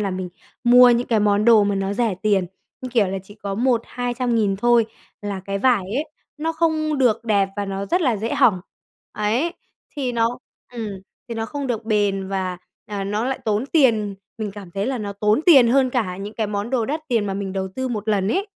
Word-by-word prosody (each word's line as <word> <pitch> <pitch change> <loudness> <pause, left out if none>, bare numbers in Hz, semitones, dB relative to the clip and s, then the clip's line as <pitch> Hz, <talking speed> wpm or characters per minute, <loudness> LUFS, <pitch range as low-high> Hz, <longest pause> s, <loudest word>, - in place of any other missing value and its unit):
là 200 -2 -1
mình 185 -1 -4 0.4
mua 245 +1 +8
những 240 +1 +1
cái 220 -3 +2
món 205 0 +2
đồ 225 -3 +6
mà 200 0 0
nó 195 0 -1
rẻ 225 -3 0
tiền, 200 -4 +2 0.3
như 255 - -5
kiểu 220 -5 +3
là, 195 - -3
chỉ 205 +2 -15
có 200 -2 -5
1-200.000 240 -2 0
thôi, 240 +1 +3 0.4
là 200 -2 -4
cái 195 0 -3
vải 235 -5 +3
ấy 290 - 0 0.3
nó 325 +2 -1
không 310 -2 0
được 235 -3 +2
đẹp 200 -3 +2
và 205 - -1
nó 195 0 -4
rất 355 - +1
là 255 -9 +2
dễ 225 +3 -2
hỏng, 185 -6 +4 0.5
ấy, 235 +11 0 0.4
thì 260 -4 -2
nó 230 +1 0 0.3
ừm, 230 -3 -4 0.4
thì 230 - -4
nó 225 0 -3
không 285 +2 -4
được 230 -3 -3
bền 205 -3 0
và, 185 -2 -2 0.3
à, 200 -2 -4
nó 210 +4 -1
lại 265 0 -2
tốn 215 +4 0
tiền. 225 -10 +2 0.2
Mình 215 -2 -3
cảm 195 -3 -10
thấy 195 +3 -2
là 260 -1 -1
nó 205 -1 -4
tốn 210 +5 +1
tiền 270 -9 +8
hơn 260 +1 +3
cả 215 -8 -1
những 205 +2 -7
cái 220 - -1
món 205 +3 -3
đồ 245 -4 +1
đắt 300 +6 -2
tiền 225 -4 +1
mà 195 - -2
mình 195 -1 -4
đầu 190 0 -2
tư 260 0 -2
1 215 -2 -4
lần 200 -2 +1
ấy. 390 - 0
220 Hz, 225 wpm, -22 LUFS, 200-245 Hz, 0.5 s, mua